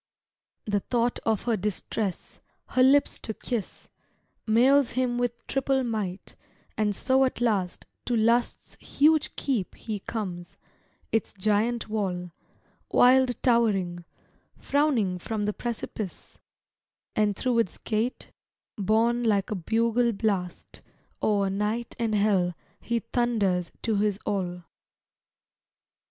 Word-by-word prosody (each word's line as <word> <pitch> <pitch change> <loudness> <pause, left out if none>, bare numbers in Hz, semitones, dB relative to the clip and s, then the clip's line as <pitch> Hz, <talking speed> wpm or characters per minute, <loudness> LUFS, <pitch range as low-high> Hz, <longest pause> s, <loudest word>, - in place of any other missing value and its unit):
The 205 -1 +1
thought 240 +3 0
of 220 -2 +1
her 235 -2 +1
distress, 210 0 -3 0.3
her 255 - +2
lips 275 +2 +4
to 220 - -5
kiss, 235 -6 -5 0.6
Mails 255 +4 +4
him 245 -1 0
with 240 -1 -2
triple 270 0 0
might; 210 -6 -4 0.4
and 210 -2 0
so 260 +4 +3
at 260 - 0
last 205 -7 0 0.2
To 245 - 0
Lust's 235 +2 +1
huge 305 +1 +2
keep 235 - -2
he 215 -3 -5
comes; 185 -5 -6 0.5
its 225 -2 -1
giant 215 +4 0
wall, 185 -5 -2 0.6
Wild 255 0 +5
towering, 195 -8 +2 0.5
frowning 250 -11 +1
from 215 +3 -3
the 210 0 0
precipice; 220 -4 -6 0.8
And 210 -1 +2
through 245 +1 +1
its 210 -6 0
gate, 225 +3 -2 0.5
borne 225 +4 +2
like 210 -4 +1
a - - 0
bugle 230 +5 +1
blast, 195 -4 -3 0.4
O'er 200 -2 +2
night 210 +4 -2
and 225 -2 0
hell 195 -4 +2 0.2
he 235 -1 -2
thunders 205 -8 0
to 220 -3 +1
his 205 -1 +1
all. 180 -3 -2
220 Hz, 115 wpm, -27 LUFS, 200-240 Hz, 0.8 s, Wild